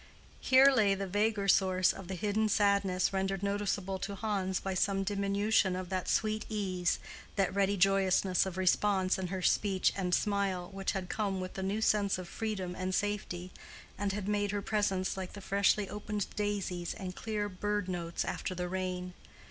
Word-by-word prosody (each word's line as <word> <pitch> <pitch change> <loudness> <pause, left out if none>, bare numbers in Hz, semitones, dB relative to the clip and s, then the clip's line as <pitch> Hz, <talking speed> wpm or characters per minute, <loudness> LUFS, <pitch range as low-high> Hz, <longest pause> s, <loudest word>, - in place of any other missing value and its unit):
Here 265 +1 +6
lay 210 -7 +3
the 195 0 -3
vaguer 205 +1 0
source 185 -1 +4
of 195 -2 -9
the 190 - -4
hidden 210 +3 0
sadness 200 -3 +2
rendered 195 0 -1
noticeable 200 -1 -1
to 200 - -4
Hans 195 -3 -1
by 195 - -3
some 195 +1 +1
diminution 200 0 +1
of 185 -1 -5
that 185 -1 -2
sweet 215 -1 +1
ease, 185 -5 0 0.4
that 195 -3 +1
ready 200 0 +2
joyousness 190 -1 +3
of 185 -1 -6
response 190 0 +2
in 185 - -2
her 185 0 -4
speech 195 -1 +2
and 180 -3 +1
smile, 200 -4 -1
which 195 0 -2
had 190 -2 -3
come 200 -1 -1
with 185 0 -5
the 190 - -5
new 200 +3 -1
sense 205 -3 +2
of 185 -1 -7
freedom 195 -4 -3
and 185 0 -2
safety, 185 -3 -2 0.4
and 205 0 -1
had 200 0 -4
made 205 -1 +1
her 205 0 -2
presence 195 -3 0
like 185 -1 -5
the 205 - -8
freshly 200 +1 +2
opened 210 0 -3
daisies 200 -4 -2
and 185 -1 -6
clear 215 -2 -2
bird 205 +1 -2
notes 170 -2 -3
after 185 - -3
the 180 0 -2
rain. 180 0 -3
195 Hz, 180 wpm, -32 LUFS, 185-205 Hz, 0.4 s, Here